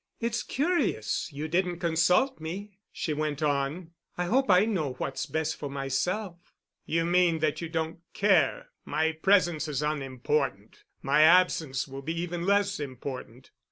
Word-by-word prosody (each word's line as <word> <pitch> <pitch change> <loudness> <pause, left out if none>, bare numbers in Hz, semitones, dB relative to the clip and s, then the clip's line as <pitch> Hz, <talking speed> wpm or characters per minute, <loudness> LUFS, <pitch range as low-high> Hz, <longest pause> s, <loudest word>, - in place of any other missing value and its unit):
"It's 235 0 -1
curious 335 - -1
you 150 +2 -4
didn't 175 +1 0
consult 175 +8 +2
me," 190 +5 -7
she 155 - -3
went 150 0 -2
on. 145 +4 -1 0.3
"I 180 - 0
hope 260 +6 +1
I 185 +2 +6
know 170 - -1
what's 135 +2 -4
best 160 +2 -2
for 145 - -5
myself——" 170 +7 -3 0.3
"You 165 +1 +1
mean 175 -1 +3
that 155 0 -1
you 170 - -4
don't 160 0 -3 0.2
care—my 160 -4 +1
presence 175 -6 +3
is 150 -1 -2
unimportant. 135 -6 -2 0.2
My 145 +3 +3
absence 160 -5 +4
will 135 0 -8
be 165 +4 -3
even 175 0 -3
less 200 -1 +2
important." 130 -2 -7
160 Hz, 145 wpm, -28 LUFS, 145-180 Hz, 0.3 s, I